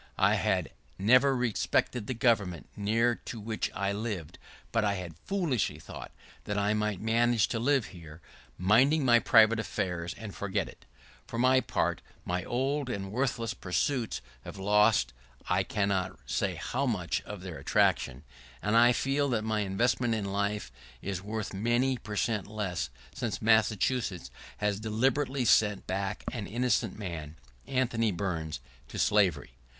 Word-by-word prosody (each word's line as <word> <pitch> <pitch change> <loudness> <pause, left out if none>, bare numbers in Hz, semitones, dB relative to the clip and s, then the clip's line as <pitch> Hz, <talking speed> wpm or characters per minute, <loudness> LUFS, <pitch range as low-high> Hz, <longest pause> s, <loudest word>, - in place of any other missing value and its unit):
I - - +4
had - - 0 0.3
never 130 +7 +5
respected 120 -2 0
the 130 - -2
government 105 - +1
near 115 +4 +2
to 115 - -6
which 110 +1 -2
I 100 +1 0
lived, 100 -6 -4 0.3
but 115 -1 +2
I 100 -1 +1
had 90 -4 -6
foolishly 155 - 0
thought 75 - -9 0.3
that 105 - -2
I 100 +1 +2
might 105 -2 -1
manage 115 0 +2
to 115 - -1
live 135 0 +2
here, 80 -3 -11 0.4
minding 130 - +4
my 120 -1 +6
private 110 0 +5
affairs, 90 -6 -3
and 110 -3 -8
forget 100 -1 -2
it. - - -14 0.4
For 115 - -5
my 130 +2 +5
part, - - -1 0.2
my 90 0 -1
old 135 +2 -1
and 95 -4 -4
worthiest 115 -3 -2
pursuits 115 - -1 0.2
have - - -9
lost 105 - +3 0.3
I - - +2
cannot 100 -2 -1
say - - -1
how 135 +3 -2
much 90 -9 -1
of 105 -3 -8
their 90 -3 -7
attraction, 65 +3 +1 0.4
and 105 +9 0
I 120 +1 +7
feel 140 +3 +1
that 115 -4 0
my 110 -1 0
investment 115 +4 +1
in 105 -2 -2
life 100 +1 -2 0.3
here 100 - -4
is 95 -2 -3
worth 110 +2 -4
many 120 +5 +1
per 105 - -7
cent 105 -1 0
less 95 - -3 0.2
since 105 -5 -3
Massachusetts 110 -2 +1 0.3
last 105 -1 0
deliberately 130 +5 0
sent 105 -3 +3
back 100 +2 -3
an 115 -5 -5
innocent 125 +4 0
man, 80 -7 -6 0.3
Anthony 120 -4 +1
Burns, 85 -6 -3 0.3
to - - -8
slavery. 100 -10 +2
105 Hz, 155 wpm, -30 LUFS, 95-120 Hz, 0.4 s, I